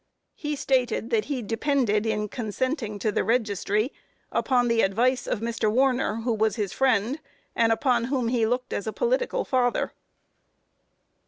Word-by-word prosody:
He 295 -1 -4
stated 250 -4 0
that 215 -2 +2
he 270 -4 -3
depended 225 -2 +1
in 210 -1 0
consenting 230 0 -3
to 210 +2 0
the - - 0
registry, 215 +1 0 0.4
upon 245 -2 +2
the 230 -1 +3
advice 245 +6 +1
of 215 - -1
Mr. 230 -2 0
Warner, 250 -2 +1
who 235 0 0
was 220 0 +1
his 205 -5 -2
friend, 255 +1 +1 0.4
and 230 -1 +3
upon 235 0 +2
whom 255 -2 0
he 235 -2 +2
looked 250 +2 -2
as 205 - -3
a 220 - -2
political - - 0
father. 250 -2 +1
235 Hz, 155 wpm, -26 LUFS, 215-260 Hz, 0.4 s, the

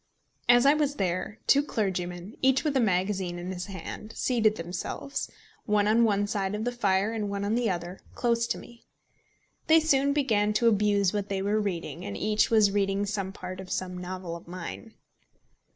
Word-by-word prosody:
As 245 +1 +7
I 280 - +7
was 295 -2 0
there, 185 +1 -2
two 280 - +5
clergymen, 185 -6 -3
each 265 0 +3
with 300 -3 0
a - - +4
magazine 190 -4 0
in 175 +2 -5
his 180 +1 -5
hand, 205 +2 -7
seated 225 -4 +2
themselves, 175 +10 -4 0.4
one 210 -1 +3
on 225 +2 +4
one 205 -2 +2
side 205 -1 -2
of 210 - -3
the 245 - 0
fire 205 -2 +1
and 210 -2 -2
one 200 0 -2
on 205 - 0
the 235 -1 +1
other, 175 0 -4 0.2
close 235 -1 +1
to - - -1
me. 235 0 -14 0.8
They 320 +1 +7
soon 280 -3 +3
began 220 -8 +2
to 230 +2 +3
abuse 205 -3 +3
what 205 -1 -2
they 195 -1 -1
were 210 +2 +1
reading, 180 -3 -4
and 205 +1 -5
each 215 0 +2
was 215 -3 +5
reading 200 0 +1
some 195 -2 -3
part 185 -1 -7
of 190 -1 -8
some 180 -1 -3
novel 180 -1 -5
of 170 - -11
mine. 185 +5 -8
205 Hz, 190 wpm, -28 LUFS, 185-230 Hz, 0.8 s, As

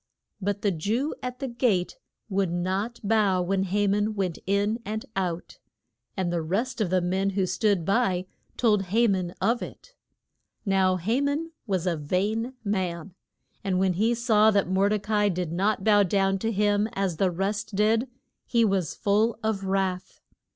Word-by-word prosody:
But 205 +1 -2
the 205 - +3
Jew 220 - -1
at 250 0 -5
the 270 - -4
gate 235 -7 0 0.3
would 195 -4 0
not 190 +7 -2
bow 205 -3 +2
when 190 +1 0
Ha 205 +2 +1
man 210 +2 +1
went 185 -4 -2
in 205 +3 +1
and 215 +1 -4
out. 180 -3 -3 0.6
And 180 -2 -1
the 170 - 0
rest 220 +10 -2
of 200 - +1
the 185 0 +2
men 190 +3 0
who 195 -1 0
stood 185 -1 +1
by 195 -3 +1 0.3
told 210 -5 +2
Ha 225 +6 +2
man 185 -3 -1
of 230 +5 +1
it. - - -9 0.7
Now 190 -2 +3
Ha 220 +10 0
man 290 +4 -1 0.2
was 190 -3 -1
a 175 -3 0
vain 210 - -1
man, 185 -4 -2 0.5
and 190 -2 0
when 190 0 +2
he 220 +6 +2
saw 220 -2 +4
that 200 -4 +2
Mor 190 +2 +2
de 215 - +2
ca 210 +2 -5
i 205 0 +3
did 180 -3 -2
not 195 +3 0
bow 205 -1 +5
to 195 +2 +1
him 205 +1 +2
as 195 -4 -1
the 190 +1 +2
rest 200 +4 -2
did 220 +5 +2 0.4
he 235 -2 +3
was 190 -6 0
full 215 +3 +1
of 215 -3 -1
wrath. 190 -1 -2
200 Hz, 175 wpm, -26 LUFS, 185-220 Hz, 0.7 s, bow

